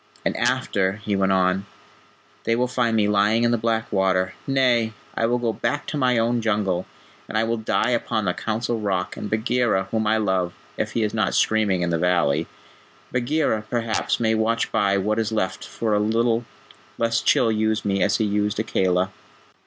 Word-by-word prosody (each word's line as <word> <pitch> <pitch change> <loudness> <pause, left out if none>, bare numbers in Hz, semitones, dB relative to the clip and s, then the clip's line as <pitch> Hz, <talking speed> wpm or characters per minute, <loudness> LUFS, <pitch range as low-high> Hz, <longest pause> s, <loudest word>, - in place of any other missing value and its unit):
"And - - 0
after," 95 -1 +1
he 105 0 -3
went 95 0 +2
on, 95 +1 +1 0.8
"they 115 - +2
will 125 +1 +1
find 120 -3 0
me 105 -1 +3
lying 105 +3 +3
in 120 - +3
the - - +3
black 115 0 -1
water. 95 -2 +1
Nay, 125 -4 +2 0.2
I 115 - 0
will 120 +1 +1
go 120 -2 -1
back 145 +5 -2
to - - -4
my 125 -4 +2
own 115 +1 +1
Jungle, 105 -5 0 0.4
and - - -2
I 110 - +3
will 115 +1 -1
die 110 +3 0
upon 115 -2 -1
the 90 - +1
Council 115 +4 -2
Rock, 95 -3 -2
and 105 - -6
Bagheera, 110 -3 0
whom 110 -1 0
I 110 +1 +3
love, 95 -4 0 0.2
if 110 - -3
he 115 - +1
is 105 - -1
not 110 -3 0
screaming 105 -5 +2
in 85 - 0
the 85 - 0
valley 85 -5 +1 0.6
Bagheera, 125 -2 0
perhaps, 115 -2 -1
may 110 -1 +2
watch 115 +1 0
by 100 -3 +2
what 105 +3 0
is 110 0 -1
left 95 -4 -2
for 110 -2 -2
a 105 - +3
little, 115 +2 +1 0.5
lest 115 0 0
Chil 115 -2 +4
use 110 0 0
me 100 -1 0
as - - +2
he 110 - +1
used 105 0 0
Akela." 95 -3 +1
110 Hz, 190 wpm, -23 LUFS, 100-115 Hz, 0.8 s, Chil